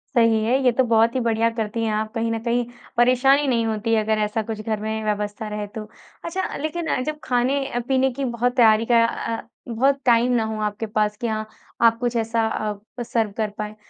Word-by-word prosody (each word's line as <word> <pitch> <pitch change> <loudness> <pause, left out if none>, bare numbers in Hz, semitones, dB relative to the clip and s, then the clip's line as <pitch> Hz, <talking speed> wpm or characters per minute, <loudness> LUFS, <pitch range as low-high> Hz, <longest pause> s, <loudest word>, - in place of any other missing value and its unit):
सही 230 -2 +4
है। 240 +4 +2
ये 250 - +5
तो 260 +2 +2
बहुत 230 0 +3
ही - - +2
बढ़िया 230 -1 +2
करती 225 +1 -2
हैं 220 - 0
आप 215 +1 -2
कहीं 230 0 -1
न 225 - -1
कहीं 240 0 0 0.3
परेशानी 260 +4 +4
नहीं 235 -3 +1
होती 225 +1 -1
है 220 -1 +3
अगर 220 0 +1
ऐसा 210 +1 0
कुछ 215 0 -5
घर 215 0 -2
में 220 0 -3
व्यवस्था 210 +1 -2
रहे 210 0 -4
तो। 215 +1 -7 0.4
अच्छा 370 +3 -3
लेकिन 320 +2 -3
अ, - - 0
जब 305 +3 -4
खाने 260 +3 +1
अ, 245 - -2
पीने 265 0 +2
की 270 +2 -3
बहुत 245 0 -1
तैयारी 225 -3 +5
का 230 -1 +6
अ, 230 0 -4 0.2
बहुत 270 +4 +1
टाइम 240 0 +4
ना 235 -2 +2
हो 220 0 -4
आपके 210 +1 -2
पास 210 -1 -1
कि 235 - -3
हाँ, 215 -1 -3 0.3
आप 230 -1 +5
कुछ 245 -1 -1
ऐसा 225 0 +1
अ, 215 +2 -5
सर्व 225 -3 -1
कर 215 -2 0
पाएँ 210 0 -5
230 Hz, 225 wpm, -22 LUFS, 215-245 Hz, 0.4 s, का